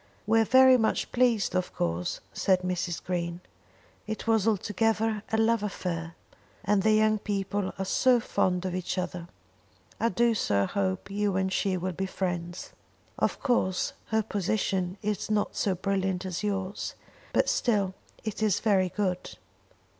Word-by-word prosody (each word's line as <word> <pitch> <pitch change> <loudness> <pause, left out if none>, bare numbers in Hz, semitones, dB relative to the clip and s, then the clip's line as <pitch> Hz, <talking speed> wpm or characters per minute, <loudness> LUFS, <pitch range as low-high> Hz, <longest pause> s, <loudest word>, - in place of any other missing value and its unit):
"We 225 +2 +4
are 225 - +4
very 260 +2 +7
much 220 -2 0
pleased 240 -4 +2
of 185 0 -1
course," 85 +1 -2
said 185 -1 +2
Mrs. 180 -1 -2
Green. 170 -1 -2 0.7
"It 220 0 -4
was 225 -2 +2
altogether 220 +1 +1
a 220 - +2
love 225 0 +3
affair, 170 -5 -4 0.5
and 205 0 +3
the 220 +2 +4
young 215 0 +3
people 200 -1 -2
are 195 - -2
so 250 +5 +4
fond 185 -4 0
of 185 - -2
each 185 +1 -3
other! 180 -1 -3 0.7
I 230 - +2
do 235 +4 +2
so 100 - +1
hope 190 -1 -2
you 205 -1 0
and 190 0 0
she 190 -2 +1
will 185 +1 -3
be 190 +3 -3
friends. 175 -2 -4 0.5
Of - - 0
course 190 -8 +1
her 220 -1 +1
position 195 -2 -1
is 210 -1 -2
not 210 -1 0
so 195 -2 +1
brilliant 190 0 -1
as 180 -2 -3
yours, 195 -2 -3 0.4
but - - +2
still 200 -5 +1 0.3
it 215 -1 -4
is 215 -4 +2
very 195 -4 +2
good. 185 -2 -2
195 Hz, 155 wpm, -28 LUFS, 185-215 Hz, 0.7 s, very